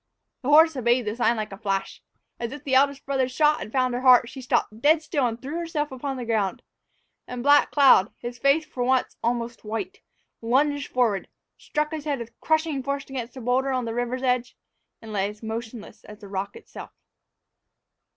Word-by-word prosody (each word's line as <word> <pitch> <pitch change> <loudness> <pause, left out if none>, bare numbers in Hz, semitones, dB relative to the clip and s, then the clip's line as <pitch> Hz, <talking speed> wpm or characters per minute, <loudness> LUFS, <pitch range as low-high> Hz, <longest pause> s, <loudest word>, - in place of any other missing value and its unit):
The 270 - -3
horse 320 +1 +6
obeyed 240 -1 +1
the 210 +1 -2
sign 235 -1 +2
like 215 -1 -4
a 195 - -9
flash. 195 -3 -3 0.4
As 235 -1 -4
if 295 +1 -9
the 275 -3 -3
eldest 275 +1 +3
brother's 265 -2 0
shot 300 +3 +3
had 215 - -7
found 255 -1 +1
her 245 - -2
heart, 250 -2 +6
she 270 -1 -9
stopped 230 -3 -1
dead 310 +3 +4
still 285 -6 0
and 230 0 -4
threw 285 +7 -5
herself 310 -4 -3
upon 265 +1 -4
the 245 - -5
ground, 215 -4 -1 0.6
and 250 -1 -6
Black 285 +1 +5
Cloud, 265 -8 +5
his 240 0 -7
face 285 +3 +3
for 260 -6 -4
once 255 0 +1
almost 235 0 -2
white, 210 -3 -5 0.4
lunged 280 +5 +1
forward, 230 -6 +1 0.3
struck 300 0 -2
his 310 -2 -5
head 290 -2 -1
with 235 -1 -10
crushing 315 -3 +1
force 280 +1 -3
against 255 -1 -6
a - - -7
boulder 255 +3 +1
on 255 -2 -1
the 225 - -3
river's 245 +2 -2
edge, 250 -1 0 0.5
and 220 -1 -8
lay 200 0 0
as 210 +1 -12
motionless 225 -1 -7
as 210 - -11
the 205 - -11
rock 195 0 -4
itself! 460 - -10
250 Hz, 200 wpm, -25 LUFS, 230-280 Hz, 0.6 s, horse